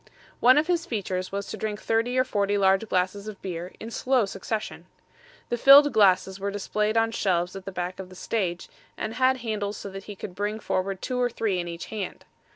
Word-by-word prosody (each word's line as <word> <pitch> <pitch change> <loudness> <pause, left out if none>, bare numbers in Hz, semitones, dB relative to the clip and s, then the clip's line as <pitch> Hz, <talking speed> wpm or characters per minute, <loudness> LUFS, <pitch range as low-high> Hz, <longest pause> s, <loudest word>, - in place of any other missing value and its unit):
One 255 +3 +6
of 300 - +4
his 345 0 0
features 185 -4 -3
was 200 0 -3
to - - -5
drink 210 -1 -3
thirty 230 +3 0
or 255 - +5
forty 205 -5 0
large 195 +2 +3
glasses 190 +3 0
of 210 -2 -7
beer 180 -1 -5
in 225 - -7
slow 255 -1 +2
succession. 205 +3 -5 0.6
The 240 - 0
filled 285 +3 +8
glasses 190 -2 +4
were 200 +1 -2
displayed 210 +2 -1
on 225 0 +3
shelves 180 -4 0
at 195 -1 -8
the 195 - -5
back 180 0 -4
of 190 -1 -7
the 185 - -13
stage, 180 -4 -2 0.3
and 215 - -3
had 260 +1 +3
handles 210 -2 -2
so 200 - -7
that 195 0 -8
he 205 - -8
could 190 - -7
bring 205 +3 -2
forward 190 -2 -2
two 250 -1 -1
or 245 - +2
three 210 -5 -1
in 175 - -3
each 170 0 -6
hand. 205 -4 -5
205 Hz, 215 wpm, -26 LUFS, 190-225 Hz, 0.6 s, filled